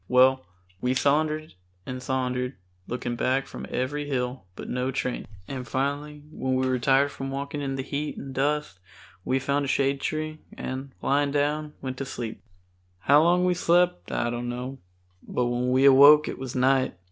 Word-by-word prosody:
Well, 130 +1 +5 0.4
we 125 +1 +1
sauntered 155 +3 +1 0.3
and 130 0 -5
sauntered, 125 0 -1 0.3
looking 120 0 -3
back 130 +3 +1
from - - -8
every 145 +3 -2
hill, 125 -4 -2
but - - -8
no 125 +1 -1
train, 130 -1 -3 0.2
and 130 -3 -5
finally 145 +4 -2
when 130 -3 -1
we 130 0 +1
were 130 -1 +1
tired 135 +3 +3
from 135 0 -5
walking 140 +2 -4
in 135 -1 -2
the 135 - -3
heat 145 +2 -3
and 135 -1 -7
dust 145 -7 -1 0.4
we 130 - +1
found 140 +2 0
a - - -4
shade 135 0 +1
tree, 155 0 -3 0.2
and, 130 +1 -5
laying 140 +1 +2
down, 150 +1 0
went 130 -1 -4
to 135 - -3
sleep. 120 -3 -6 0.6
How 145 - +6
long 175 +2 +4
we 180 - +3
slept 175 - +2
I 120 0 0
don't 120 0 -3
know, 125 +2 -5 0.4
but 125 - -1
when 120 +1 0
we 130 +2 +4
awoke 145 +3 +8
it - - -5
was 130 -1 -6
night. 130 -1 +2
135 Hz, 180 wpm, -26 LUFS, 125-145 Hz, 0.6 s, awoke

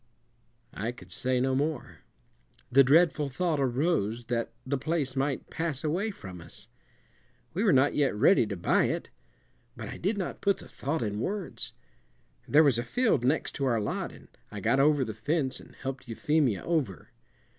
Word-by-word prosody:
I 115 +4 -2
could 125 - -14
say 130 -1 0
no 130 +1 +1
more. 145 0 -2 0.7
The 135 +2 +7
dreadful 150 +1 +4
thought 160 +3 0
arose 125 - 0
that 115 -1 -1
the 135 +1 -1
place 145 -3 -1
might 135 +1 -1
pass 160 -4 -2
away 175 +8 0
from 95 - -9
us. - - -8 0.8
We 190 +6 0
were 215 - +5
not 135 +1 +4
yet 140 -6 +2
ready 115 - +5
to 100 -2 -4
buy 85 - +3
it. - - -3 0.7
But - - -6
I - - -6
did 205 +4 -1
not 185 - -4
put 200 -1 +2
the - - -11
thought 145 0 -3
in 105 -1 -2
words. 200 - -4 0.7
There 150 +2 +6
was 135 -6 +4
a - - -1
field 220 - +1
next 140 +5 +1
to 140 - 0
our 120 -4 +2
lot, 105 - -2
and - - -15 0.2
I 105 - -6
got 135 +7 +2
over 145 -1 +4
the 110 - -5
fence 130 +4 -1
and - - -15
helped 135 -1 -6
Euphemia 125 - +1
over. 145 - -2
135 Hz, 175 wpm, -29 LUFS, 120-160 Hz, 0.8 s, The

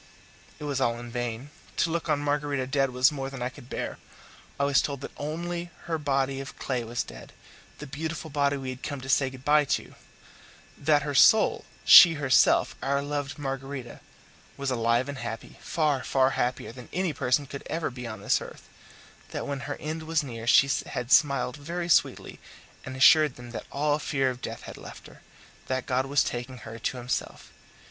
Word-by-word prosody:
It - - -10
was 140 -2 -2
all 115 -2 +1
in 120 0 -9
vain. 120 +3 -4 0.3
To 165 - +2
look 170 0 -2
on 145 -1 +2
Margarita 145 -2 -1
dead 135 +1 +1
was 125 +4 +4
more 135 -2 -4
than 135 -2 -6
I 125 - -1
could 120 0 -15
bear. - - -4 0.6
I - - +2
was 140 0 +4
told 140 -2 -4
that - - -7
only 170 +3 -4
her 165 -2 -2
body 135 -2 0
of 135 - -9
clay 125 -3 -2
was 120 +1 -2
dead - - -12 0.4
the - - -8
beautiful 155 +2 -5
body 140 0 +1
we 130 -1 -5
had 130 0 -9
come 145 -2 -4
to 130 - -9
say 135 0 +3
good 130 0 -13
bye 150 0 +5
to; - - -2 0.8
that 145 0 +2
her 145 - -3
soul 220 - +5 0.2
she 170 -3 +10
herself, 140 -3 +3
our 140 +1 0
loved 145 0 -3
Margarita 135 -3 -5 0.6
was 140 -1 -2
alive 115 +1 +1
and 140 -1 -6
happy, 115 -1 -7
far, 150 -5 0
far 130 0 +2
happier 125 -2 -2
than 125 0 -12
any 180 -3 -1
person 130 +3 +1
could 140 +1 -8
ever 160 -3 -2
be 125 -1 -7
on 110 -3 -7
this - - +2
earth; - - -11 0.6
that - - -4
when 140 -1 -3
her 145 - -2
end 155 +1 -5
was 160 -1 0
near 115 -4 -7
she 135 +3 +6 0.2
had 125 -1 -4
smiled 140 -2 +4
very 170 +4 -4
sweetly, 175 - +1 0.4
and 130 - -7
assured 150 +1 +6
them 120 -1 -11
that 120 - -7
all 150 +1 +1
fear 135 -3 0
of 125 0 -9
death - - -6
had - - -9
left - - -11
her - - -15 0.5
that 130 -1 -2
God 130 +1 0
was 140 0 +3
taking 125 +1 -5
her 115 +1 -8
to 125 - -2
Himself. 125 0 -4
135 Hz, 195 wpm, -27 LUFS, 125-145 Hz, 0.8 s, she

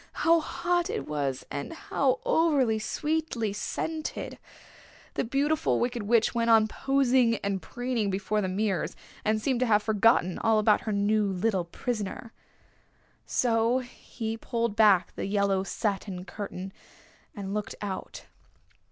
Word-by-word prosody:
How 335 0 +6
hot 350 +3 -1
it 445 0 -3
was, 140 -3 -2
and 140 - -4
how 320 -8 0
over 275 -9 +3
sweetly 260 -2 -1
scented! 315 +9 -4 0.7
The - - 0
Beautiful 275 - +1
Wicked 240 -1 -1
Witch 225 +2 +2
went 235 -1 +1
on 220 -1 +6
posing 260 -2 +2
and 195 -2 -1
preening 245 -4 -2
before 200 +2 -1
the 190 - -1
mirrors, 195 0 -1 0.3
and 215 0 +1
seemed 255 +2 0
to 255 - +2
have 210 -1 +3
forgotten 215 -4 +3
all 225 -1 +3
about 215 0 +4
her - - +1
new 210 +1 +2
little 190 -1 0
prisoner. 220 +3 -4 0.9
So 230 0 +2
he 235 -3 -6
pulled 230 -2 -2
back 200 -5 +4
the - - -4
yellow 200 -1 +1
satin 195 -2 -3
curtain, 195 -2 -6 0.6
and 200 -2 -5
looked 210 +1 -3
out. 200 -2 -6
220 Hz, 135 wpm, -28 LUFS, 200-255 Hz, 0.9 s, How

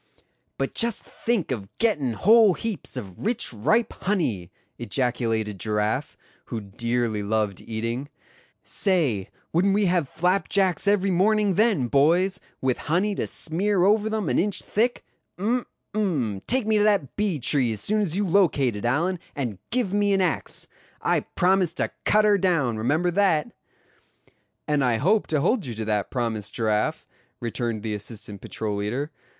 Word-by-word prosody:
"But - - -2
just 235 -2 0
think 225 - -2
of 100 -6 -4
gettin' 150 - +1
whole 215 - +5
heaps 225 -4 -5
of 95 -3 -8
rich 225 - 0
ripe 215 - +1
honey!" 125 - -1 0.3
ejaculated 115 -3 -1
Giraffe, 105 +6 -1 0.3
who 115 - -4
dearly 115 +1 -2
loved 105 -2 -1
eating; 115 +5 -4 0.5
"say, 145 - +1 0.2
wouldn't 195 +4 +3
we 205 0 +2
have 175 -6 +1
flapjacks 185 +2 +1
every 200 -1 +3
morning 205 +2 +3
then, 210 - +3
boys, 175 +9 +3 0.2
with 130 -2 0
honey 190 +6 +2
to - - -2
smear 180 +4 +1
over 210 +2 +3
them 220 -4 -2
an - - +2
inch 200 +2 0
thick? 240 +4 0 0.3
Um! 235 +6 0 0.3
um! 145 - -1
take 255 -1 +1
me 215 -1 +2
to - - +3
that 200 - +1
bee 205 -6 0
tree 130 -1 +1
as 105 -2 -3
soon 215 - +1
as 185 -3 0
you 205 - +1
locate 165 - +2
it, 105 - -5
Allan, 170 +9 +1 0.2
and 120 -9 -3
give 235 -6 0
me 205 -1 +2
an 195 - +2
axe. 180 -3 -1 0.3
I - - +1
promise 180 -2 +1
to - - -2
cut 215 0 +4
her 205 -1 +4
down, 165 -11 +1
remember 155 +11 +1
that." 180 -5 +2 1.2
"And 150 -2 +2
I 120 -3 +2
hope 200 - +2
to 150 -3 +1
hold 210 - +1
you 120 - -5
to 110 0 -4
that 105 -2 -1
promise, 115 -4 -2
Giraffe," 110 -1 -1 0.3
returned 115 -2 -3
the 110 -2 -2
assistant 105 -1 -6
patrol 105 -2 -4
leader. 125 +9 -2
160 Hz, 160 wpm, -25 LUFS, -, 1.2 s, whole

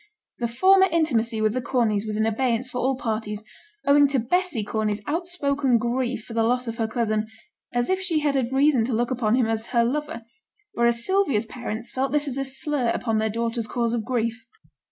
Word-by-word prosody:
The 240 - 0
former 380 +11 +5
intimacy 235 -9 +1
with 215 0 +2
the 255 - -1
Corneys 225 -4 0
was 215 0 -2
in 220 - +2
abeyance 245 +2 0
for 250 - -3
all 265 +2 +1
parties, 215 -3 -3 0.4
owing 285 +1 +6
to 275 0 0
Bessy 275 - 0
Corney's 210 0 -2
out 335 +4 -2
spoken 280 -7 +1
grief 240 0 -2
for 230 - -10
the 230 - +1
loss 250 +2 +1
of 230 0 -4
her 225 -2 0
cousin, 220 -2 -1 0.4
as 245 0 0
if 375 0 0
she 335 -5 0
had 295 -1 +1
had 260 -3 0
reason 270 -2 +3
to 250 - -2
look 240 +2 0
upon 235 -3 +1
him 250 -2 +2
as 225 0 -2
her 235 -2 +2
lover, 295 +1 -2 0.5
whereas 235 0 +2
Sylvia's 375 - +1
parents 235 0 -6
felt 265 0 -1
this 295 0 +1
as 270 -1 -2
a 275 - -1
slur 265 -1 +2
upon 225 -2 0
their 220 0 0
daughter's 230 +1 -2
cause 235 0 -1
of 235 -2 -1
grief. 230 -1 -2
240 Hz, 210 wpm, -24 LUFS, 225-275 Hz, 0.5 s, owing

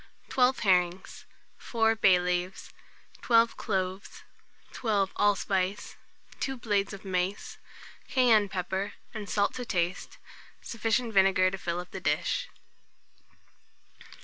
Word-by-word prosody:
12 255 0 +3
herrings, 180 -2 0 0.3
4 225 -1 +1
bay 190 -4 +5
leaves, 180 +1 -3 0.5
12 230 -1 +4
cloves, 190 -2 -3 0.5
12 205 -5 0
allspice, 200 -1 0 0.4
2 270 - -2
small - - -9
blades 205 -4 0
of 195 -1 -10
mace, 185 +1 -3 0.5
cayenne 235 -6 +4
pepper 190 +1 -3 0.2
and 215 -3 -6
salt 200 -1 +1
to 250 - -5
taste, 180 -5 -2 0.4
sufficient 230 0 -1
vinegar 190 -1 +4
to 195 - -4
fill 170 -1 -3
up 180 - -8
the - - -7
dish. - - -1
200 Hz, 115 wpm, -28 LUFS, 185-225 Hz, 0.5 s, bay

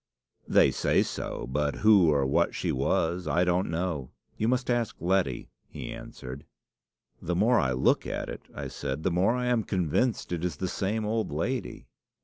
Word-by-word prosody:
"'They - - +5
say - - +2
so; - - -5
but 70 +3 -1
who 100 -5 +5
or 70 -3 +2
what 65 - +1
she - - -1
was, 85 +2 0
I 90 - +2
don't 90 +1 +1
know. 80 -6 -2 0.3
You 110 - -1
must 125 +1 +1
ask 120 -2 0
Letty," 90 -8 0 0.2
he - - -7
answered. 65 +3 -8 0.8
"'The 90 - -2
more 115 +7 +4
I 65 -2 +1
look 65 - +2
at - - -3
it,' - - -8
I - - -6
said, 70 +4 -4
'the 95 - +1
more 95 +7 +2
I 125 0 -1
am 120 -2 +2
convinced 95 - 0
it 85 -1 -2
is 90 -4 -1
the 95 - -3
same 105 +4 -1
old 110 +1 -1
lady. 125 -4 -3
90 Hz, 180 wpm, -28 LUFS, 80-110 Hz, 0.8 s, They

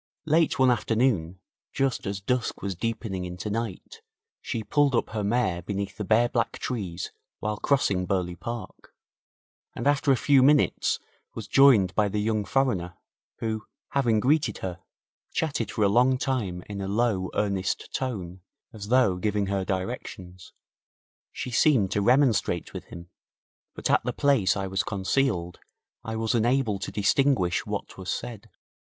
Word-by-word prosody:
Late 160 +1 +2
one 130 -1 +5
afternoon, 110 -7 0 0.3
just 135 -5 -1
as 100 0 -3
dusk 125 +4 -2
was 100 -1 -2
deepening 95 -1 -3
into 90 +4 -5
night, 115 - -5 0.4
she 115 -2 -3
pulled 145 +1 +2
up - - 0
her 110 -2 -2
mare 100 -5 0
beneath 100 +2 -4
the 105 - -4
bare 110 +4 +3
black 120 -1 -1
trees 95 -8 -4 0.3
while 105 0 -3
crossing 100 -9 +1
Burghley 90 -2 -1
Park, 115 +6 -8 0.8
and - - -5
after 145 0 +3
a 130 - +4
few 135 +3 +4
minutes 145 +2 +3 0.4
was - - -6
joined 115 -10 +5
by 105 -1 +2
the 105 - -3
young 105 0 0
foreigner, 95 -7 0 0.5
who, 110 -1 -3 0.2
having 120 -6 +2
greeted 130 -2 +2
her, 90 -2 -5 0.5
chatted 140 -9 -1
for 110 - -1
a - - +5
long 125 +5 +4
time 110 -10 -2
in 100 -1 -5
a 95 - -3
low, 100 -3 0
earnest 100 -2 -1
tone, 95 -9 -4 0.3
as 105 -2 -8
though 120 -6 +3
giving 105 +1 0
her 95 0 -1
directions. 95 -2 -5 0.8
She 125 - -5
seemed 120 -6 +3
to 105 - +1
remonstrate 120 - +2
with - - -7
him, 85 0 -11 0.6
but - - -3
at - - +3
the - - -2
place 125 -10 +2
I 100 - -2
was 95 +1 0
concealed 100 -3 -1 0.4
I 110 -1 -4
was 110 0 0
unable 120 -2 +1
to - - -5
distinguish 105 -4 +2
what - - -5
was - - -6
said. - - -5
105 Hz, 155 wpm, -26 LUFS, 95-125 Hz, 0.8 s, one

